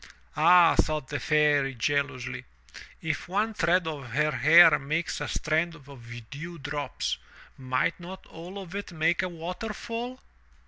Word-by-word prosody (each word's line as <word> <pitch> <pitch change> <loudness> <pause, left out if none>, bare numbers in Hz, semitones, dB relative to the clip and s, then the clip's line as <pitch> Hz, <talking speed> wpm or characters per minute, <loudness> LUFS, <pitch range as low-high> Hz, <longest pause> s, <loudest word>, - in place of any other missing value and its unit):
"Ah," 175 -1 +6
thought 155 -4 0
the 150 - -3
Fairy 150 -3 +2
joyously, 130 0 -2 0.6
"if 155 -3 -3
one 210 +5 0
thread 180 -3 +2
of 145 -6 -5
her 150 +3 +2
hair 155 0 +7
makes 155 +5 -2
a - - -2
strand 165 +2 -1
of 120 -6 -12
dew 170 +4 -7
drops, 145 -1 -3 0.4
might 130 +6 -1
not 185 +2 -10
all 175 +4 -10
of 190 -2 -8
it 200 -1 -5
make 165 +1 +1
a 185 - -2
waterfall?" 225 +8 -6
160 Hz, 140 wpm, -27 LUFS, 140-175 Hz, 0.6 s, hair